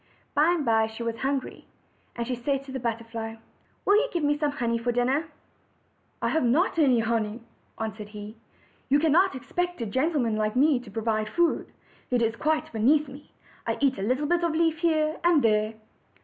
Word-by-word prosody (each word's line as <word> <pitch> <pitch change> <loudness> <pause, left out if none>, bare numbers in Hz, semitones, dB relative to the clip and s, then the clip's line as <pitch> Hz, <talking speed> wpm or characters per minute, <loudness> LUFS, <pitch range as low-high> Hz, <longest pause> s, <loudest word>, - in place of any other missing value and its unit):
By 300 +3 +4
and 320 -5 -1
by 225 -1 +3
she 220 +1 -7
was 230 -1 -3
hungry, 270 0 -3 0.5
and 235 - -3
she 255 - -2
said 270 +3 -1
to 275 - -10
the 265 - -4
butter 230 -1 -2
fly: 225 -1 -6 0.5
"Will 405 - +5
you - - +2
give 340 -3 -1
me 290 0 +3
some 295 0 0
honey 235 -4 -1
for 240 +1 0
dinner?" 260 +6 +1 1.0
"I - - +2
have 320 - +1
not 310 +8 +2
any 260 -6 +4
honey," 225 -1 -1
he 235 - -17 0.4
answered; 215 -1 -6
"you 220 +6 -4
could 315 0 +2
not 365 +2 +4
expect 355 +6 -3
a 230 - -2
gentleman 260 -1 0
like 215 +1 -1
me 280 0 +4
to 245 -4 -12
provide 215 0 -1
food. 345 +4 0 0.4
It 245 -2 +2
is 225 0 0
quite 310 +3 -1
beneath 285 +7 +3
me. 275 +2 -12 0.4
I - - 0
eat 270 -6 +1
a - - -3
little 255 +8 0
bit 345 +3 +1
of 335 -2 +1
leaf 325 -1 +2
here 315 -2 +1
and 340 -4 +4
there." 215 0 +2
255 Hz, 200 wpm, -26 LUFS, 225-310 Hz, 1.0 s, Will